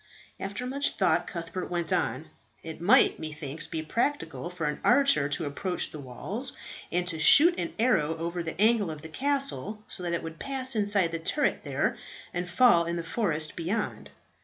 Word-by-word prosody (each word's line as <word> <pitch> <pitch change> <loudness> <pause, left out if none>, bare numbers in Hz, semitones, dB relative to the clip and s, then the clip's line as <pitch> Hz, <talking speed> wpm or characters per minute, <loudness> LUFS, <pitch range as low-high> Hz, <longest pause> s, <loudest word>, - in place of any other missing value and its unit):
After 205 +5 -4
much 280 +3 -1
thought, 175 -2 +2
Cuthbert 170 +1 -5
went 170 -2 -1
on, 155 +5 -1 0.3
"It 160 0 -8
might, 175 - +5
methinks, 155 0 -5
be 160 -1 -4
practicable 165 - -2
for 175 -2 -4
an 150 - -2
archer 250 - +4
to 155 +3 -2
approach 175 +6 -3
the 155 - -8
walls, 190 - -4 0.4
and 180 0 0
to 170 -3 -3
shoot 320 - +8
an 335 - -3
arrow 165 -10 +2
over 170 +2 -3
the 165 +1 -6
angle 215 -3 +3
of 155 -1 -7
the 160 - -8
castle 260 - -2
so 195 - -5
that 175 -1 -2
it 170 - -2
would 165 0 -8
pass 265 -2 -3
inside 200 -5 +2
the 165 - -3
turret 295 - 0
there, - - -1 0.3
and 175 0 -3
fall 180 -4 +5
in 170 +1 -2
the 170 - -3
forest 165 -5 -1
beyond. 190 +6 -3
175 Hz, 185 wpm, -28 LUFS, 160-225 Hz, 0.4 s, shoot